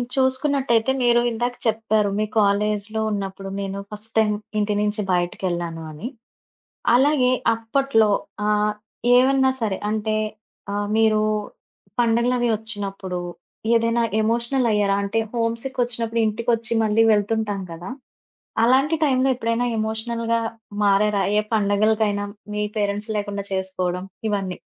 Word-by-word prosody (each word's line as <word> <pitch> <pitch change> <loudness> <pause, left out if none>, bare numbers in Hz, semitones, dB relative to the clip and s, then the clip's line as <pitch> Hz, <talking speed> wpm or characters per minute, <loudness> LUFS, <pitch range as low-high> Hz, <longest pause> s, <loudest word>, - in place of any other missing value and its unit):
చూసుకున్నట్టయితే 260 -2 +2
మీరు 240 0 +4
ఇందాక 240 +1 -2
చెప్పారు 220 -1 +1
మీ 215 - +2
కాలేజీలో 210 +1 +1
ఉన్నప్పుడు 195 -1 -4
నేను 195 0 -4
ఫస్ట్ 210 +1 -9
టైమ్ 215 -1 +3 0.2
ఇంటి 210 0 +1
నుంచి 210 +1 0
బయటికెళ్ళాను 175 -2 -2
అని. 155 +10 -6 0.9
అలాగే 265 0 +4 0.3
అప్పట్లో 225 0 +2 0.4
ఆహ్, 210 0 +2 0.4
ఏవన్నా 265 +1 +4
సరే 205 -4 0
అంటే, 215 0 -1 0.6
ఆహ్, 205 0 -1
మీరు 220 -1 +4 0.8
పండగలవి 240 +1 +2
ఒచ్చినప్పుడు 200 -4 -5 0.6
ఏదైనా 230 +1 +2 0.2
ఎమోషనలయ్యరాా? 230 -3 +2
అంటే, 200 +3 0 0.2
హోమ్‌సిక్ 230 +3 -2
ఒచ్చినప్పుడు 230 -1 -2
ఇంటికొచ్చి 230 +1 -1
మళ్ళీ 220 +1 +3
వెళ్తుంటాం 210 -1 0
గదా! 165 +7 -7 0.7
అలాంటి 270 +6 +4
టైంలో 265 -1 +2
ఎప్పుడైనా 230 0 0
ఎమోషనల్‌గా 230 +1 -1 0.4
మారారా, 200 0 +3
ఏ - - +5
పండగలకైనా 205 0 +2 0.3
మీ 210 0 -1
పేరెంట్స్ 205 +1 -1
లేకుండా 205 -1 -3
చేసుకోవడం, 185 -1 -2 0.2
ఇవన్నీ? 195 -3 -2
220 Hz, 110 wpm, -22 LUFS, 205-235 Hz, 0.9 s, ఏ